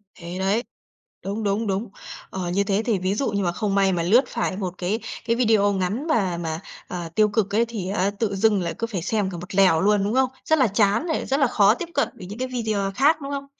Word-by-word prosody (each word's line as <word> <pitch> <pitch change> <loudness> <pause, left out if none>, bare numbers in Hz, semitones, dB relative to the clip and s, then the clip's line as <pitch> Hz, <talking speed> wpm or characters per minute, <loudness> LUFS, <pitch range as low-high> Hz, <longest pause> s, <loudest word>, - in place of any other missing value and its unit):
Thế 175 +1 -7
đấy! 200 +5 +1 0.6
Đúng, 205 +3 -3
đúng, 205 +2 0
đúng. 195 +3 -2 0.4
Ờ, 185 -2 -4
như 200 +3 +1
thế 200 +1 0
thì 220 -6 +1
ví 185 +2 0
dụ 270 - -1
như 200 -1 -1
mà 175 - +1
không 200 +2 -2
may 195 -1 +3
mà 170 -1 0
lướt 230 +9 +5
phải 230 -5 -2
một 185 -3 -3
cái 190 +5 -1 0.3
cái 230 - +1
video 220 -4 +3
ngắn 200 - -2
mà 195 - +1
mà, 160 -1 -3 0.3
à, 175 -2 -5
tiêu 215 -1 +4
cực 205 -1 0
ấy 230 +2 +3
thì 215 -6 -5
á 195 -1 +1
tự 210 -4 0
dưng 205 -1 +3
lại 170 - -2
cứ 230 - -1
phải 200 -6 -4
xem 200 +2 0
cả 180 - -6
một 180 +3 -8
lèo 185 -5 +5
luôn, 205 0 +3
đúng 205 +2 -1
không? 260 0 +3 0.2
Rất 315 -1 +3
là 260 - +5
chán 205 - +2
này, 320 - -1
rất 275 +2 0
là 275 - +4
khó 210 -3 +4
tiếp 340 +7 -6
cận 285 - +2
với 185 - -9
những 210 +5 -8
cái 255 - -1
video 220 -6 -1
khác, 290 +5 +4
đúng 275 0 -5
không? 280 -1 -4
205 Hz, 260 wpm, -23 LUFS, 190-230 Hz, 0.6 s, lướt